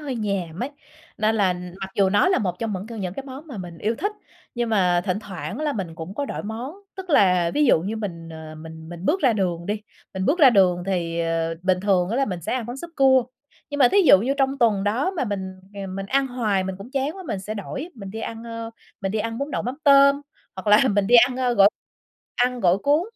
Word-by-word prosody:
hơi 285 -3 -4
nhàm 195 -6 -3
ấy, 265 - -3 0.5
nên 220 +1 +2
là 195 -4 +3 0.3
mặc 195 0 -5
dù 195 -1 +3
nó 205 - +4
là 375 - +3
một 180 -4 -1
trong 225 -2 -2
những 190 +1 -5
c - - -14
những 195 -6 -4
cái 275 - -5
món 270 +4 -9
mà 275 -7 -8
mình 175 -3 -8
yêu 215 +7 0
thích, 410 +2 -1 0.4
nhưng 240 -1 -1
mà 180 -5 +3
thỉnh 190 -1 0
thoảng 205 - -6
là 300 -1 0
mình 190 -9 -5
cũng 160 +4 -8
có 285 - -2
đổi - - -5
món. 230 +8 -5 0.2
Tức 375 -2 -7
là 180 - +4
ví 300 - +3
dụ 240 - +5
như 205 +6 -3
mình, 170 -6 -6
ờ, 160 -1 -9
mình 160 0 -10
mình 175 +1 -8
bước 350 - +1
ra 260 -6 +4
đường 175 -5 -1
đi, 210 +1 -2 0.3
mình 190 0 -2
bước 315 - +2
ra 280 -6 +8
đường 185 -5 +3
thì, 170 -3 -1
ờ, 165 0 -1
bình 185 0 +2
thường 185 -3 +2
á 230 - -1
là 275 - +3
mình 180 -8 -4
sẽ - - -3
ăn 250 -3 -3
món 240 +2 -6
súp 340 +5 -8
cua, 265 -2 +5 0.5
nhưng 285 - -3
mà 255 -4 +6
thí 405 - +3
dụ 335 - +7
như 250 +8 0
trong 270 0 +1
tuần 215 -5 +2
đó 240 - +1
mà 355 -8 -2
mình, 195 -4 -4 0.2
ờ, 200 -1 -5
mình 195 +1 -5
ăn 270 +6 +1
hoài 220 -7 0
mình 190 0 -3
cũng 200 +6 -10
chán 275 +4 -2
quá, 380 - -8
mình 230 - -2
sẽ 210 +3 -5
đổi, 240 - -5
mình 200 -5 -8
đi 220 +3 -6
ăn, 225 0 -6
ơ, 230 -1 -6 0.3
mình 195 -1 -2
đi 220 - 0
ăn 225 +2 -3
bún 280 +2 -3
đậu - - -2
mắm 250 +4 -3
tôm, 280 0 +6 0.4
hoặc 190 - -8
là 210 +6 +6
mình 205 -2 +1
đi 240 - +3
ăn, 250 -1 -5
ơ, 250 -2 +1
gỏi 200 -2 +7 0.7
ăn 250 0 +1
gỏi 180 -1 +3
cuốn 290 +8 +2
210 Hz, 260 wpm, -23 LUFS, 185-260 Hz, 0.7 s, ra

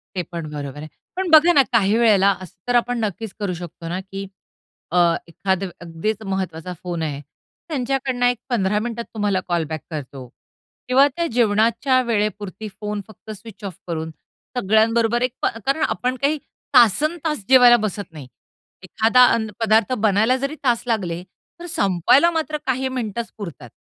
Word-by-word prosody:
ते 185 - 0
पण 165 -3 -5
बरोबर 145 -2 -6
आहे. 155 - -7 0.3
पण 375 -1 -2
बघा 320 +2 +7
ना, 280 - +7
काही 215 -1 +3
वेळेला 205 -4 +5
असं 185 -1 -11
तर 245 - +1
आपण 240 0 +1
नक्कीच 215 -1 -4
करू 200 -3 -2
शकतो 170 -1 -8
ना, 180 +2 -2
की 195 +1 -7 0.6
अ, 180 - +1 0.3
एखादं 190 +2 -2
अगदीच 175 +6 -3
महत्त्वाचा 185 -3 -4
फोन 175 -2 -3
आहे, 145 -2 -3 0.5
त्यांच्याकडनं 260 -3 -1
एक 245 -1 +2
15 210 -3 +1
मिनिटात 235 0 -4
तुम्हाला 205 -3 0
कॉल 175 -2 0
बॅक 155 -2 -4
करतो 135 -4 -7 0.6
किंवा 265 +3 +5
त्या 340 -1 0
जेवणाच्या 235 +3 +3
वेळेपुरती 210 -2 -2
फोन 210 0 -3
फक्त 215 0 -12
स्विच 215 +1 -12
ऑफ 190 -4 -6
करून 160 -1 -4 0.5
सगळ्यांबरोबर 225 +2 +2
एक 250 -1 0
प - - 0 0.2
कारण 275 +4 +1
आपण 250 +1 -1
काही 295 +2 +2 0.4
तासंतास 300 - +3
जेवायला 245 -2 +8
बसत 205 -2 -5
नाही. 150 -5 -10 0.6
एखादा 230 +6 +4
अन्न 220 -2 -1
पदार्थ 225 +1 +3
बनायला 220 +6 +3
जरी 275 +3 -3
तास 240 -3 +2
लागले, 180 -7 -1 0.4
तर 345 - -8
संपवायला 260 - +3
मात्र 315 -2 -2
काही 260 0 0
मिनिटंच 235 -3 -4
पुरतात. 160 - -8
215 Hz, 160 wpm, -21 LUFS, 185-250 Hz, 0.6 s, जेवायला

